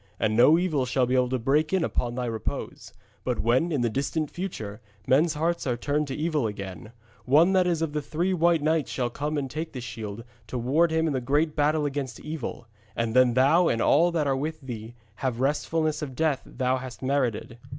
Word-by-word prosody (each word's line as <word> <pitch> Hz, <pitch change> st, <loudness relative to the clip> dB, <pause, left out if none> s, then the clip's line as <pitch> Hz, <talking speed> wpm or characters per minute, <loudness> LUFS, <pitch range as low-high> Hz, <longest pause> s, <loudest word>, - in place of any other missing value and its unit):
And 110 Hz, 0 st, +1 dB
no 125 Hz, +8 st, +6 dB
evil 155 Hz, -8 st, 0 dB
shall 125 Hz, 0 st, +2 dB
be 125 Hz, -, -1 dB
able 125 Hz, -1 st, +3 dB
to 130 Hz, -, 0 dB
break 145 Hz, +6 st, +1 dB
in 190 Hz, -3 st, +2 dB
upon 120 Hz, -5 st, -1 dB
thy 125 Hz, 0 st, -2 dB
repose. 115 Hz, -2 st, -5 dB, 0.3 s
But 125 Hz, 0 st, -1 dB
when, 130 Hz, +9 st, +2 dB
in 145 Hz, -5 st, 0 dB
the 120 Hz, -, +2 dB
distant 145 Hz, +4 st, -2 dB
future, 115 Hz, -, -6 dB, 0.2 s
men's 155 Hz, +5 st, +3 dB
hearts 165 Hz, 0 st, -1 dB
are 120 Hz, -2 st, 0 dB
turning 145 Hz, +4 st, -1 dB
to 135 Hz, -, -4 dB
evil 155 Hz, -5 st, 0 dB
again, 100 Hz, -1 st, -7 dB, 0.3 s
one 160 Hz, +8 st, +5 dB
that 185 Hz, -1 st, +3 dB
is 165 Hz, -2 st, +1 dB
of 155 Hz, -2 st, -2 dB
the 150 Hz, -, -1 dB
three 170 Hz, +6 st, -1 dB
white 170 Hz, -3 st, +3 dB
knights 155 Hz, -1 st, +1 dB
shall 120 Hz, -2 st, -2 dB
come 150 Hz, +4 st, -3 dB
and 140 Hz, -2 st, -1 dB
take 155 Hz, +4 st, -5 dB
this 125 Hz, -3 st, -6 dB
shield, 115 Hz, -2 st, -6 dB, 0.2 s
to 125 Hz, -, -4 dB
ward 145 Hz, +8 st, +2 dB
him 160 Hz, 0 st, +1 dB
in 155 Hz, -, 0 dB
the 130 Hz, -, -1 dB
great 150 Hz, +5 st, +1 dB
battle 150 Hz, +1 st, +2 dB
against 135 Hz, -5 st, -3 dB
evil, 150 Hz, -6 st, -5 dB, 0.3 s
and 115 Hz, 0 st, -1 dB
then 125 Hz, -2 st, +5 dB
thou 155 Hz, +7 st, +5 dB
and 115 Hz, -, +1 dB
all 165 Hz, +9 st, +4 dB
that 160 Hz, -3 st, 0 dB
are 135 Hz, -1 st, +1 dB
with 155 Hz, +4 st, -3 dB
thee 120 Hz, -3 st, -7 dB, 0.2 s
shall 135 Hz, -, -1 dB
have 125 Hz, -, -1 dB
the 125 Hz, -, -1 dB
restfulness 155 Hz, +2 st, 0 dB
of 135 Hz, -4 st, -5 dB
death 150 Hz, -2 st, +1 dB
thou 130 Hz, 0 st, 0 dB
hast 130 Hz, -1 st, -8 dB
merited. 130 Hz, -4 st, -1 dB
140 Hz, 225 wpm, -26 LUFS, 125-155 Hz, 0.3 s, no